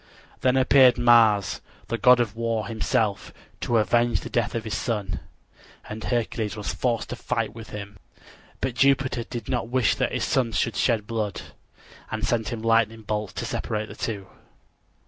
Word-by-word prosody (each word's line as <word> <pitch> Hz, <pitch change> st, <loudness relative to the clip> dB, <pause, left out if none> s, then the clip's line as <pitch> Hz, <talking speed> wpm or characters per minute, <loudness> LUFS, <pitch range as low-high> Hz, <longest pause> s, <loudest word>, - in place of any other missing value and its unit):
Then 130 Hz, 0 st, +2 dB
appeared 130 Hz, -1 st, +6 dB
Mars, 115 Hz, -5 st, +4 dB, 0.3 s
the 115 Hz, -, -2 dB
god 125 Hz, +2 st, +6 dB
of 115 Hz, -3 st, -1 dB
war, 115 Hz, -2 st, -1 dB
himself, 110 Hz, -1 st, -1 dB, 0.3 s
to 120 Hz, -, +1 dB
avenge 120 Hz, +2 st, +2 dB
the -, -, -8 dB
death 120 Hz, -2 st, 0 dB
of 115 Hz, -, -2 dB
his 110 Hz, -3 st, -3 dB
son; 100 Hz, -3 st, -2 dB, 0.7 s
and 110 Hz, +1 st, -7 dB
Hercules 115 Hz, -3 st, -1 dB
was 105 Hz, -, -3 dB
forced 120 Hz, -3 st, -1 dB
to -, -, -4 dB
fight 115 Hz, -2 st, -2 dB
with 115 Hz, -1 st, -10 dB
him. 100 Hz, -1 st, -8 dB, 0.6 s
But 130 Hz, -, -1 dB
Jupiter 135 Hz, -1 st, +2 dB
did 115 Hz, -2 st, -7 dB
not 120 Hz, -3 st, -2 dB
wish 125 Hz, -2 st, +2 dB
that -, -, -1 dB
his -, -, -2 dB
sons 120 Hz, -4 st, +1 dB
should 115 Hz, -, 0 dB
shed 115 Hz, -4 st, +1 dB
blood, 110 Hz, -3 st, -3 dB, 0.7 s
and 110 Hz, 0 st, -2 dB
sent 110 Hz, -1 st, 0 dB
his 115 Hz, -1 st, -5 dB
lightning 115 Hz, -1 st, +2 dB
bolt 105 Hz, -3 st, -3 dB
to -, -, -3 dB
separate 110 Hz, 0 st, -3 dB
the -, -, -9 dB
two. 100 Hz, -4 st, -4 dB
115 Hz, 170 wpm, -25 LUFS, 105-120 Hz, 0.7 s, appeared